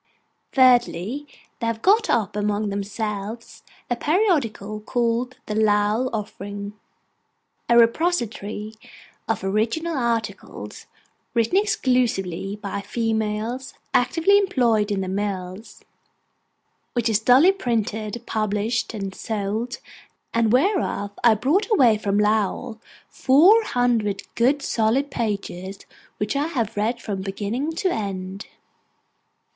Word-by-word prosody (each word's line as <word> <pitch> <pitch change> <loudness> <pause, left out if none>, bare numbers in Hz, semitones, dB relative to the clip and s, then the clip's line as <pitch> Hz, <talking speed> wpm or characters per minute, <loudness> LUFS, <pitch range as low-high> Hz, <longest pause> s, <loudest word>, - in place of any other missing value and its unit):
Thirdly, 255 0 +3 0.3
they 230 - -2
have 225 -1 -3
got 435 +4 +4
up 210 -3 +1
among 210 0 0
themselves 210 +2 -5 0.3
a 245 - 0
periodical 275 - 0
called 240 +2 -1
THE 210 - -4
LOWELL 215 +3 +2
OFFERING, 205 -1 -5 1.0
'A 235 - +5
repository 230 - +1 0.5
of 220 -3 -1
original 230 +12 0
articles, 235 -4 -3 0.5
written 230 +7 +1
exclusively 230 - 0
by 200 -1 -5
females 225 +3 -2 0.2
actively 330 +11 +4
employed 235 - +2
in 200 -2 -1
the 190 - -3
mills,'—which 190 +1 -5 1.2
is 220 -2 +2
duly 255 +11 +6
printed, 225 - -2
published, 215 +2 -1
and 195 -2 -4
sold; 220 +4 -3 0.6
and 230 -2 +2
whereof 265 - +1
I 230 -2 +6
brought 320 - +1
away 250 - +4
from 200 -1 0
Lowell 220 +2 0 0.3
four 355 +13 +5
hundred 235 - 0
good 275 +4 +2
solid 245 +6 +1
pages, 195 -4 -4 0.3
which 210 +5 -2
I 285 +2 +1
have 240 -10 -2
read 225 +4 0
from 200 -4 -4
beginning 210 +10 -3
to 370 +2 0
end. 195 -2 -4
225 Hz, 110 wpm, -23 LUFS, 205-255 Hz, 1.2 s, duly